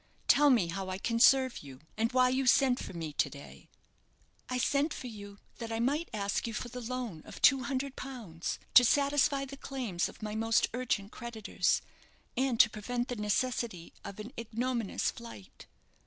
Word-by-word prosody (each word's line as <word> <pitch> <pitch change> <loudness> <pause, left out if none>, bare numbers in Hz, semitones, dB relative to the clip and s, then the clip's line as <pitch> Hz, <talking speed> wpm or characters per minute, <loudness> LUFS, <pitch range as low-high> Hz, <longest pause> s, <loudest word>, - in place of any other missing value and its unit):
Tell 290 +1 +6
me 225 -10 +3
how 190 +2 -4
I 185 - -3
can 230 +3 -1
serve 260 +1 +5
you, 135 -3 -11 0.2
and 225 +2 0
why 255 0 +4
you 260 +1 0
sent 255 0 +4
for - - -7
me 160 -3 -5
to - - +1
day?" 140 0 -12 0.8
"I 255 - -1
sent 280 +4 +1
for - - -8
you 205 -4 -9 0.2
that 230 -1 -5
I 225 - -2
might 290 +8 0
ask 200 +2 -1
you 225 - -5
for 240 - -4
the 250 +1 -7
loan 235 -8 -4
of - - -11
two 270 -2 +6
hundred 270 +1 -2
pounds, 220 -12 -5 0.2
to 250 - +9
satisfy 280 +1 +3
the 275 +1 -9
claims 245 -12 -2
of - - -13
my 210 0 -3
most 225 +1 +2
urgent 230 -5 -2
creditors, 235 -4 -1 0.5
and 260 -2 0
to - - +5
prevent 240 +4 -4
the 245 - -2
necessity 210 -3 -2
of 200 0 -8
an 225 +5 -8
ignominious 235 -1 -1
flight." 235 - -12
235 Hz, 185 wpm, -31 LUFS, 210-260 Hz, 0.8 s, to